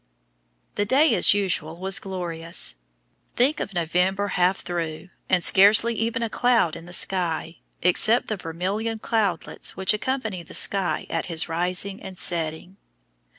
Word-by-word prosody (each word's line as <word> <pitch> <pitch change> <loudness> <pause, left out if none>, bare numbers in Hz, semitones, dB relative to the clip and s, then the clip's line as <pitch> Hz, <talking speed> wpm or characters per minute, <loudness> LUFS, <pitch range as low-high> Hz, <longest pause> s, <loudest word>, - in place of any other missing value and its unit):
The 205 - -1
day, 280 +8 +4
as - - +5
usual, 170 -5 -2
was 190 +2 +1
glorious. 170 - -1 0.6
Think 265 +5 +2
of 195 - -5
November 180 +4 0
half 185 +1 +1
through 170 0 -5 0.2
and 180 -2 +2
scarcely 210 +6 +5
even 230 +1 -2
a - - 0
cloud 230 -7 +1
in 165 - -11
the - - -11
sky, 170 -3 +1 0.2
except 215 +7 +2
the 215 - -2
vermilion 195 +6 -4
cloudlets 215 -6 -2
which 190 +1 +3
accompany 220 -4 -3
the 165 - -9
sun 195 -3 +1
at 165 - -2
his 165 -2 0
rising 180 +4 -2
and 190 -1 -9
setting! 170 +2 -2
185 Hz, 145 wpm, -23 LUFS, 170-210 Hz, 0.6 s, as